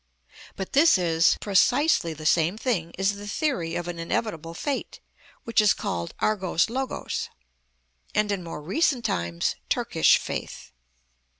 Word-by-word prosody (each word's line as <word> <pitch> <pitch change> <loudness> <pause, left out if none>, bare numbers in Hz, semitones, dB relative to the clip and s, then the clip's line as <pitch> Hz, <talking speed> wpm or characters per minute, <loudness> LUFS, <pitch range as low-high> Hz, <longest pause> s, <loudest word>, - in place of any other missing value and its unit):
But 190 - -6
this 300 -3 +6
is 165 -2 +3
precisely 210 - +3
the 155 +1 -10
same 170 +5 +2
thing 205 -9 -1
as 195 +2 +1
the 205 0 -8
theory 205 - -1
of 175 0 -3
an 175 -1 -5
inevitable 165 -2 -3
fate 280 - -4 0.4
which 230 -1 +3
is 210 - +4
called 85 -1 -4
αργος 190 -3 +1
λογος, 260 +2 -3 0.9
and 210 0 +2
in 195 -3 -2
more 165 -3 -7
recent 255 - +1
times 85 0 -1
Turkish - - +3
faith. - - -6
190 Hz, 135 wpm, -25 LUFS, 165-230 Hz, 0.9 s, this